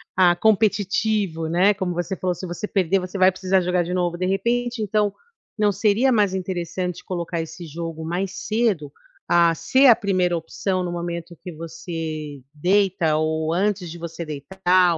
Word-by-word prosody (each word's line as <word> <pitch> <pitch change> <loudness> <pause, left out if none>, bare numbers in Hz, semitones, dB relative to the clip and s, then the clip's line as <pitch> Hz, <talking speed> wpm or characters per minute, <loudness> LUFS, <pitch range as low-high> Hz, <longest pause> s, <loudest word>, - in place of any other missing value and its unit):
ah, 180 -2 +5
competitivo, 205 -3 +1
né, 185 +5 +4
como 190 -2 -3
você 175 +2 -2
falou, 180 -1 -1
se 185 - -7
você 175 +4 -5
perder, 195 -1 +1
você 185 +1 -6
vai 185 0 +6
precisar 190 0 +1
jogar 180 0 +1
de 175 +1 -4
novo, 175 -1 0
de 185 +1 -1
repente 235 +5 0
então, 210 0 +1 0.5
não 210 -1 +3
seria 210 +6 +2
mais 205 -5 +2
interessante 180 -1 -3
colocar 170 -2 -3
esse 165 +2 -8
jogo 165 0 -6
mais 180 +3 -2
cedo, 215 -10 0 0.4
ah, 170 -1 +5
ser 260 +13 +4
a 235 - +9
1a 185 -4 +1
opção 185 +3 -2
no 175 - -3
momento 170 0 -5
que 180 - -8
você 160 -3 -6
deita 180 0 +2
ou 155 0 0
antes 185 -1 0
de 170 - -8
você 170 0 -6
deitar, 175 +4 +2
180 Hz, 170 wpm, -23 LUFS, 165-195 Hz, 0.5 s, a